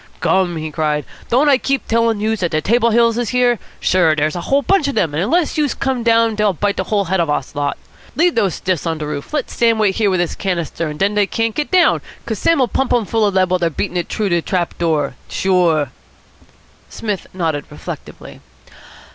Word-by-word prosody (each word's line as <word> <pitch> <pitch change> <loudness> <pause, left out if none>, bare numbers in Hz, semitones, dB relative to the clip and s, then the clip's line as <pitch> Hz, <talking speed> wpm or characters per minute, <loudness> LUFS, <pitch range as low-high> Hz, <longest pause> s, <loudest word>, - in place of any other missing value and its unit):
"Gum!" 185 -2 +1
he 155 -1 -4
cried, 150 -2 -1 0.2
"don't 265 +5 +3
I 275 -2 +5
keep 275 0 -1
tellin' 230 -1 +1
youse 220 +1 -1
dat 175 - 0
de 155 - 0
Table 235 +8 +2
Hills 230 0 +3
is 240 - -1
here? 245 -3 +2 0.2
Sure, 175 -4 +3
dere's 155 +1 0
a 175 - -3
whole 275 +9 +1
bunch 380 -4 +2
of 280 - -2
dem, 155 -4 +1
and 150 - -1
unless 310 - +1
youse 295 -2 +1
come 265 -1 -1
on 235 - -4
down 230 -1 +3
dey'll 210 -2 +1
bite 200 +4 -1
de 190 - -1
hull 200 0 0
head 190 +2 0
off 165 -3 +1
of 145 - +2
us 135 - -5
lot. 145 -1 -2 0.4
Leave 345 +2 +3
those 200 -6 +1
stiffs 180 -3 -2
on 165 -1 -1
de 155 - -4
roof. 145 -1 -5
Let 295 -4 -2
Sam 230 -1 +2
wait 210 -3 +1
here 215 -3 +2
with 185 -1 +1
his 175 -2 0
canister, 170 -3 -3
and 150 0 -6
den 200 +4 +1
dey 205 -1 +2
can't 225 +1 -1
get 295 +4 -2
down, 365 -2 +4 0.2
'cos 220 -4 -3
Sam'll 280 -7 +3
pump 265 +2 -1
dem 235 -3 +2
full 220 0 +1
of 200 - -2
lead 185 -1 +2
while 185 - +2
dey're 170 -1 +1
beatin' 180 +3 -4
it 175 -1 -2
t'roo 215 - -1
de 175 -2 +1
trap 175 0 -2
door. 155 -5 0 0.2
Sure." 175 -6 +1 1.0
Psmith 210 -4 -4
nodded 160 -6 -2
reflectively. - - -9
200 Hz, 230 wpm, -18 LUFS, 170-230 Hz, 1.0 s, I